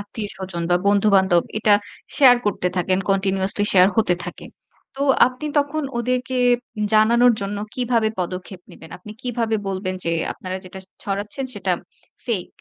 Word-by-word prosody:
আত্মীয়স্বজন 195 -4 -6
বা 175 - +4
বন্ধু-বান্ধব 195 -3 +3 0.2
এটা 210 -1 +4 0.4
শেয়ার 255 -4 +7
করতে 185 -3 0
থাকেন, 185 +1 +1
continuously 195 +1 +1
share 185 0 +6
হতে 215 -5 +2
থাকে। - - -9 0.5
তো 275 - -2 0.2
আপনি 255 +4 -6
তখন 290 +2 -1 0.2
ওদেরকে 250 +1 -2 0.6
জানানোর 235 +3 +4
জন্য 200 +1 -4 0.2
কীভাবে 235 -3 +1
পদক্ষেপ 180 +1 -6
নিবেন? 160 - -14
আপনি 210 +3 -11
কিভাবে 230 -3 -1
বলবেন 185 -1 -3
যে 165 - 0 0.2
আপনারা 185 0 -6
যেটা 185 +1 -10 0.2
ছড়াচ্ছেন 205 +6 -4
সেটা - - -1 0.5
ফেক 210 -8 -2
205 Hz, 140 wpm, -21 LUFS, 185-235 Hz, 0.6 s, শেয়ার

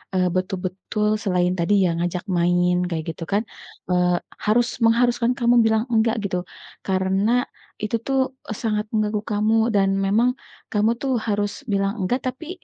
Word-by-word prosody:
eee, 180 -1 +2
betul-betul 190 +3 -1
selain 180 -2 +1
tadi 170 +5 +2
ya 175 - +2
ngajak 175 +1 -2
main 175 0 +2
kayak 160 -2 -3
gitu 160 - -8
kan, 205 +2 +1 0.5
eee, 180 0 +3 0.3
harus 235 +3 +3 0.2
mengharuskan 240 +1 +3
kamu 240 -1 +3
bilang 220 0 +2
enggak 225 +1 +2
gitu? 180 -2 -3 0.4
Karena 195 +6 +2 0.4
itu 215 +2 -1
tuh 265 +2 0 0.3
sangat 210 -2 0
mengganggu 215 0 +1
kamu 215 +2 +2 0.2
dan 195 -1 +3 0.2
memang 225 +6 +3 0.4
kamu 210 +1 +2
tuh 275 - -1 0.2
harus 205 -1 0 0.2
bilang 195 +2 0
enggak, 195 +7 0
tapi 325 +6 -10
205 Hz, 145 wpm, -22 LUFS, 185-230 Hz, 0.5 s, eee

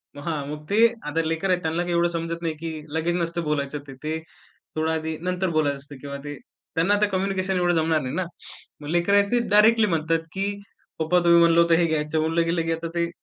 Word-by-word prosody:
मग 145 - -9
हां, 155 -4 -2
मग 150 0 -7
ते 225 +3 +6 0.2
आता 150 +2 -1
लेकर 165 +4 -1
आहेत 180 -1 +2
त्यांना 160 +1 -1
काही 175 0 -2
एवढं 170 0 +3
समजत 170 0 -4
नाही 160 -2 -1
की 160 -1 -5 0.2
लगेच 170 +2 0
नसतं 170 0 -2
बोलायचं 150 -1 -2
ते. 135 - -9
ते 155 +4 -4 0.6
थोडं 160 +1 0
आधी 160 0 -2
नंतर 180 0 -1
बोलायचं 150 -3 +1
असतं 140 +1 -12
किंवा 140 -1 -6
ते 145 0 -6 0.4
त्यांना 170 +5 +3
आता 210 +1 +3
कम्युनिकेशन 190 -1 -1
एवढं 175 0 +2
जमणार 160 -1 +2
नाही 130 0 -4
ना. 185 - 0 0.6
मग 145 - -8
लेकरं 175 +4 +2
आहेत 200 0 +4
ते 245 - +3
डायरेक्टली 215 +1 +5
म्हणतात 165 -1 +1
की 195 +1 -1 0.5
"पप्पा, 160 +3 +3
तुम्ही 170 0 +6
म्हणलं 170 0 +5
होतं 170 -1 +4
हे 170 +1 +3
घ्यायचं." 155 -1 0
म्हणलं 165 +2 +1
गेल 165 0 0
की 165 - -1
आता 165 +1 -4
ते 170 0 0
165 Hz, 225 wpm, -24 LUFS, 155-180 Hz, 0.6 s, ते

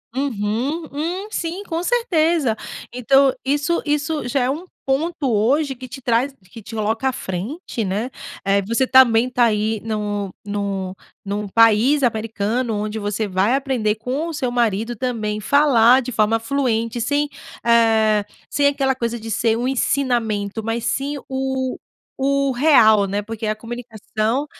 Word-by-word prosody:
Uhum, 265 +4 -1
hum, 345 +8 -3
sim, 355 -2 -3
com 330 +1 -3
certeza. 335 - +2 0.4
Então, 270 +3 +4
isso 290 +5 +1
isso 295 -2 -1
já 270 +2 0
é 250 - +1
um 320 +7 -3 0.2
ponto 285 0 -1
hoje 270 +7 +2
que 255 +1 -9
te 265 +2 -9
traz 245 +3 +1 0.2
que 225 - -11
te 225 - -10
coloca 220 +4 -1
à 265 - +2
frente, 225 - -4
né? 205 +7 -2 0.3
Eh, 200 0 +2
que - - -11
você 260 +2 +2
também 250 -2 +5
tá 250 -1 +2
aí, 215 0 0
nu 205 -3 -3
nu 200 -2 -3 0.3
num 205 +1 -3
país 230 +7 +4
americano, 225 0 -1
onde 210 +1 -3
você 205 0 -2
vai 190 +5 +1
aprender 255 -6 0
com 260 +9 -3
o 330 - -5
seu 265 -4 -1
marido 230 -1 0
também 220 -5 -2
falar 260 -1 +5
de 255 - -6
forma 225 0 +2
fluente, 230 -2 -1
sem, 285 +5 0 0.3
eh, 220 -3 +3 0.2
sem 285 - +1
aquela 270 -2 +2
coisa 235 -1 -3
de 225 - -8
ser 225 +1 +1
um 245 - -1
ensinamento, 230 -6 0
mas 225 +1 -2
sim 275 +5 -1
o 265 -1 -2 0.4
o 275 0 +2
real, 235 -7 +5
né? 200 +2 -1
Porque 220 +1 -6
a 215 - 0
comunicação 230 +2 -3
240 Hz, 155 wpm, -21 LUFS, 215-275 Hz, 0.4 s, também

